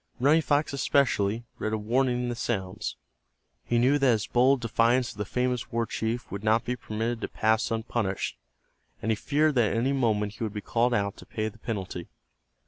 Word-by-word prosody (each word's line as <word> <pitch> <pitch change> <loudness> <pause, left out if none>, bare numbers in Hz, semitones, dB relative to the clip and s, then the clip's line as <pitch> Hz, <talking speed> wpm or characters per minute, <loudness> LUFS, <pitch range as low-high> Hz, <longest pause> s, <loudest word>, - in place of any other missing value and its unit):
Running 145 +6 +5
Fox, 145 -1 +1
especially, 120 -6 +1 0.2
read 110 - -2
a - - +1
warning 125 +3 +1
in 120 - -1
the - - -1
sounds. 95 -6 -3 0.7
He 120 - 0
knew 130 +5 +4
that 135 -2 +4
his 105 -2 -1
bold 130 +2 +3
defiance 120 +2 +2
of 105 - -14
the 105 - -1
famous 125 +2 -1
war 115 0 0
chief 115 +2 -3
would 100 +1 -5
not 110 +1 +2
be 125 - -1
permitted 115 0 -3
to - - -2
pass 110 +1 +1
unpunished, 110 -3 -2 0.6
and 110 - -1
he - - +2
feared 150 +7 +1
that 120 -5 +3
at - - -1
any 130 +4 +1
moment 105 -6 +1
he 115 - -6
would 110 -2 -3
be 105 - -3
called 120 +3 +1
out 100 -2 -1
to - - -12
pay 110 0 -2
the 110 - -18
penalty. 95 -6 -5
115 Hz, 205 wpm, -27 LUFS, 110-125 Hz, 0.7 s, Running